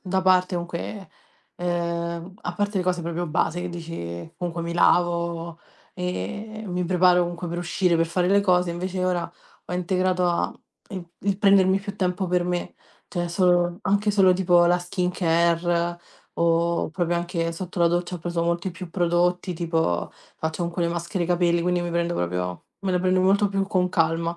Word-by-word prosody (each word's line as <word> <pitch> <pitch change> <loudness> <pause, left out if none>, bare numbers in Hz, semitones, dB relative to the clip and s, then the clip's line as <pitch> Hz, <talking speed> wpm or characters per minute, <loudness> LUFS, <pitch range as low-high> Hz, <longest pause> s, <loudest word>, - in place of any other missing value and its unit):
da 190 0 0
parte 185 0 +3
comunque 175 +3 -5 0.5
uhm, 170 0 -2
a 175 - -3
parte 205 +1 -1
le - - +1
cose 180 -1 0
proprio 170 +1 -3
base 160 +2 0
che 180 - -3
dici, 160 - -6
comunque 175 -2 -3
mi 170 - -3
lavo, 170 -1 +1 0.3
e 190 - -4
mi 180 -1 -2
preparo 180 0 +4
comunque 175 0 -4
per 175 +1 -3
uscire 175 0 +1
per 165 0 +2
fare 175 +2 0
le 200 +1 +5
cose, 180 -3 +2
invece 185 +1 -3
ora 180 -2 -1 0.4
ho - - -6
integrato 180 0 +1
a 170 - +1
mhmm, - - -15 0.4
il 175 - -10 0.2
il 195 - +2
prendermi 195 -2 +5
più 200 0 -6
tempo 185 0 0
per 180 0 +1
me, 175 0 -3 0.3
cioè 175 -2 -2
solo 175 0 +2
anche 205 +2 +2
solo 195 -3 +5
tipo 180 -1 +4
la 175 +1 +4
skincare, 175 -1 0 0.3
o 170 0 +1
proprio 175 0 -1
anche 170 -1 -2
sotto 180 +2 -6
la 170 - +6
doccia 175 +1 -1
ho - - -10
preso 170 0 -2
molti 170 +2 -1
più 180 +1 -8
prodotti, 175 +1 +1
tipo 165 - 0 0.3
faccio 160 +1 -3
comunque 170 0 -2
le - - +1
maschere 170 +1 -2
capelli, 175 -1 +2
quindi 180 0 +1
mi 175 - -3
prendo 170 0 0
proprio 90 0 -2 0.2
me 190 -2 -1
le 180 - +2
prendo 185 0 +2
molto 200 +2 +4
più 195 0 -1
con 185 -2 +1
calma. 165 0 +1
175 Hz, 180 wpm, -24 LUFS, 170-185 Hz, 0.5 s, la